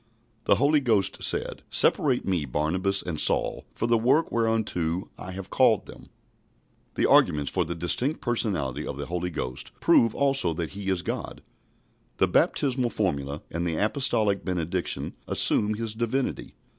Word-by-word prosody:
The - - +5
Holy 145 +3 +3
Ghost 110 -7 0
said, - - -1
"Separate 130 -5 +2
me 90 -5 0
Barnabas 90 +9 0
and 85 -4 -4
Saul - - +2
for - - -2
the 115 -1 +2
work 130 +8 +2
where 115 -1 +1
unto 90 -6 -1
I 90 - -9
have 95 0 -8
called - - +3
them." - - -13 0.9
The - - +1
arguments 75 -2 +3
for - - 0
the 85 +2 -5
distinct 120 - 0
personality 85 - -2
of 70 - -5
the 70 - -5
Holy 90 +2 -3
Ghost 65 -7 -5
prove 115 -1 +3
also 135 - +2
that 85 -1 -4
He 100 0 -7
is 95 -2 -1
God. - - -5 0.7
The - - +3
baptismal 130 -3 +1
formula 70 -9 -2
and 85 +1 -3
the 80 - -2
apostolic 105 - +1
benediction 90 0 -3
assume 105 0 +4
His 115 0 -4
Divinity. 120 +4 -3
95 Hz, 155 wpm, -26 LUFS, 85-115 Hz, 0.9 s, The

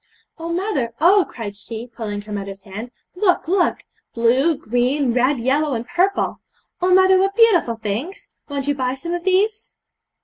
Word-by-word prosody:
'Oh, 335 +1 -4
mother, 335 - -2
oh!' 370 +5 +5
cried 210 -4 -7
she, 220 +3 -7
pulling 215 -4 -6
her 210 - -11
mother's 200 -1 -6
hand, 210 +5 -7 0.3
'look, 360 -3 +1
look! 360 +1 +1 0.3
blue, 255 +7 +3
green, 255 0 0
red, 255 +3 +2
yellow, 275 +3 +1
and 230 +1 -5
purple! 370 +3 0 0.4
Oh, 365 +1 +2
mother, 375 0 +6
what 390 +1 +1
beautiful 395 - +4
things! 225 - -5 0.2
Won't 280 -1 -3
you 290 - +2
buy 260 -2 -2
some 335 +6 -5
of 350 -1 -3
these?' 410 +3 0
280 Hz, 165 wpm, -20 LUFS, 230-360 Hz, 0.4 s, mother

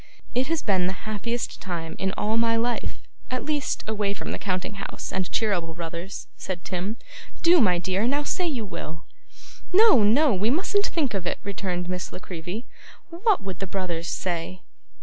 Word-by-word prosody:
'It 255 +2 +2
has 330 -1 0
been 185 -4 +3
the 190 - 0
happiest 230 +3 -2
time 165 -3 -4
in 190 0 +1
all 215 +1 0
my 230 0 +4
life; 235 +1 -1 0.3
at 255 0 -2
least, 295 -2 0
away 205 -2 0
from - - -5
the - - -3
counting 185 0 -1
house - - -5
and 190 -1 0
Cheeryble 175 -7 +1
Brothers,' 170 +3 -5
said 180 -2 -5
Tim. 190 +5 -2 0.5
'Do, 340 -2 +7
my 180 -5 +5
dear! 190 +5 +1
Now 285 +3 +2
say 360 +4 0
you 255 -9 -1
will.' 165 -3 -6 0.7
'No, 380 - +7
no, 245 +7 +5
we 200 +4 +2
mustn't 390 +8 +2
think 285 - 0
of 185 -3 -2
it,' - - 0
returned 185 -3 -2
Miss 180 0 -3
La - - -6
Creevy. 185 +3 -6 0.5
'What 385 - +3
would 190 -3 -5
the 195 - -2
brothers 175 -3 -2
say? 180 +1 -2
200 Hz, 180 wpm, -26 LUFS, 180-245 Hz, 0.7 s, Do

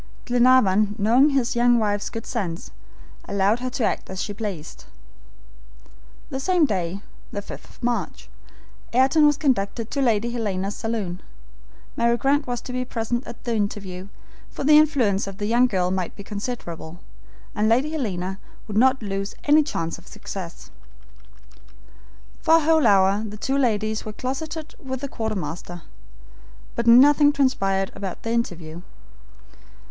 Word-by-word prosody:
Glenarvan, 235 -5 +4
knowing 235 +7 +4
his 265 -3 0
young 240 0 +4
wife's 205 -2 0
good 225 -1 -6
sense, 185 -9 -4 0.6
allowed 200 +3 +2
her 255 +1 -3
to 245 - -3
act - - -1
as 190 0 -6
she 205 - -3
pleased. 200 -7 -6 1.5
The 265 - -3
same 350 +2 +3
day 190 -5 -2 0.3
(the 205 - -5
5th - - -9
of - - -18
March), 240 0 -2 0.7
Ayrton 270 +5 +5
was 295 -1 +2
conducted 230 -5 -1
to 280 - -1
Lady 235 -2 +1
Helena's 205 -4 -2
saloon. 210 -6 -3 0.7
Mary 235 0 +2
Grant 280 +3 +1
was 245 -1 -3
to 250 - -8
be 255 0 -1
present 240 0 -3
at 235 - -10
the 235 - -2
interview, 200 -3 -3 0.4
for - - -6
the 300 +2 +6
influence 250 -11 +2
of 195 -1 -7
the 205 - -3
young 240 +4 +4
girl 185 -5 0
might 185 -2 -2
be 200 - -9
considerable, 195 -6 -6 0.5
and 215 +1 +1
Lady 260 +7 +2
Helena 195 - -3 0.3
would 210 -1 -3
not 260 0 +3
lose 195 -1 -4
any 300 +1 +5
chance 165 - -3
of 175 - -19
success. 180 -4 -8 1.7
For 325 - +5
a - - +2
whole 315 0 +4
hour 195 +1 +4
the 210 -1 -7
two 270 +6 -1
ladies 220 -5 0
were 215 - -7
closeted 305 +7 -5
with 260 -1 -5
the 280 - -3
quartermaster, 185 - -5 0.9
but 235 0 -3
nothing 290 +5 +7
transpired 195 -9 +1
about 195 -3 -6
their 225 - -2
interview. 175 -8 -3
225 Hz, 150 wpm, -23 LUFS, 195-260 Hz, 1.7 s, nothing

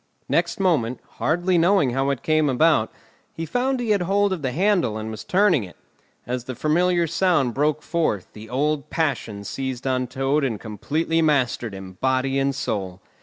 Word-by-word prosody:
Next - - 0
moment, 140 -11 +1 0.2
hardly 175 +3 +2
knowing 175 -6 +3
how 135 +2 0
it 140 -3 -2
came 155 -2 +2
about, 135 -3 +3 0.4
he 165 - -4
found 250 - 0
he 235 -3 -1
had 205 -3 +2
hold 200 +2 +2
of 180 - -4
the 130 -2 -1
handle 175 - +1
and 110 0 -5
was 110 -1 -7
turning 185 - +3
it. 90 - -11 0.5
As 125 0 -3
the 130 - -5
familiar 170 +6 +2
sound 165 -7 +1
broke 150 +2 0
forth, 155 - -1
the 110 +1 -11
old 145 +2 -1
passion 125 -10 -2
seized 130 +3 -4
on 130 -1 0
Toad 135 +3 0
and 115 -6 -1
completely 155 +10 -1
mastered 125 -8 +1
him, 95 -1 -10
body 130 +1 +1
and 135 0 0
soul. 95 -8 -3
140 Hz, 175 wpm, -23 LUFS, 120-170 Hz, 0.5 s, knowing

